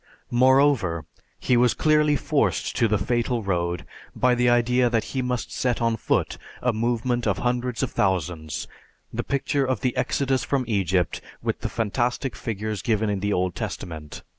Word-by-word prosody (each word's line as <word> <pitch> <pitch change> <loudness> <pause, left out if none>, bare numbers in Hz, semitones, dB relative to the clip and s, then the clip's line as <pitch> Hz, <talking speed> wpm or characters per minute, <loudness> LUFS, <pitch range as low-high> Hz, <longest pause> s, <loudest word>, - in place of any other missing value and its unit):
Moreover, 125 - +3 0.3
he 125 - +2
was 120 0 +4
clearly 150 -1 +3
forced 135 - 0
to 115 - +4
the 105 0 +2
fatal 120 +1 0
road 85 -4 -1 0.3
by 125 0 +3
the 125 0 +3
idea 120 +1 +3
that 115 -2 +1
he 130 - 0
must 125 -1 -2
set 125 -2 0
on 115 -1 +1
foot 115 - -1 0.2
a 125 -1 +1
movement 120 +1 0
of 100 - +1
hundreds 125 0 -1
of - - -1
thousands, 85 -5 -1 0.5
the - - -2
picture 140 +1 0
of 130 -5 -1
the 125 -2 0
exodus 135 -2 0
from 135 -3 0
Egypt 95 -5 0 0.2
with - - -1
the - - -3
fantastic 120 +4 -1
figures 110 -1 -4
given 110 -2 +1
in 100 - -1
the 100 +2 -1
Old 90 -2 0
Testament. 80 -3 -6
120 Hz, 165 wpm, -24 LUFS, 100-125 Hz, 0.5 s, was